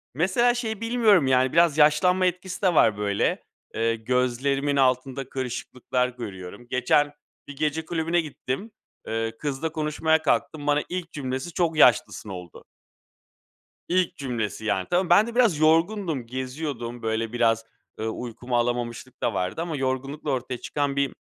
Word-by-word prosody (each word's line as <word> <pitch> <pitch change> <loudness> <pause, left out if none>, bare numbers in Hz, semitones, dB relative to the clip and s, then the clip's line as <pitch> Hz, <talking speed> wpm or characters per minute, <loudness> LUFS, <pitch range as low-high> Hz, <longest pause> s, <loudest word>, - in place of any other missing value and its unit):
mesela 235 - +3
şeyi 225 -3 -3
bilmiyorum, 225 - +4
yani, 130 0 +3
biraz 170 -3 +4
yaşlanma 170 +5 +4
etkisi 180 +1 -2
de 185 -3 +3
var, 110 -7 +5
böyle. 100 -1 0 0.3
Eee, 115 0 +1
gözlerimin 125 +4 0
altında 130 0 +1
kırışıklıklar 125 0 -2
görüyorum. 100 -2 -9
Geçen 145 +4 +2 0.3
bir 145 - -8
gece 155 +2 -1
kulübüne 165 +1 0
gittim. 155 - -5 0.4
Eee, 115 0 -2
kızla 150 +2 -2
konuşmaya 160 0 +1
kalktım. 150 -1 0
Bana 145 0 +3
ilk 175 -2 -4
cümlesi: 135 +3 -4
"Çok 165 -3 0
yaşlısın." 115 -5 +4
oldu. 90 -3 -9 1.3
İlk 180 0 +1
cümlesi, 115 -5 -3
yani, 95 -3 -1
tama 180 0 +1
ben 200 +5 +6
de 235 - -7
biraz 230 -11 +3
yorgundum, 165 - +2
geziyordum. 130 -1 -5
Böyle, 110 0 -1
biraz, 115 -2 +2 0.4
ııı, 110 0 -1
uykumu 120 +2 -4
alamamışlık 120 +1 -2
da 115 - 0
vardı 90 - -2
ama 165 -3 -3
yorgunlukla 135 +3 -2
ortaya 130 -1 -2
çıkan 145 -1 -2
bir 140 -1 +1
135 Hz, 145 wpm, -25 LUFS, 120-165 Hz, 1.3 s, ben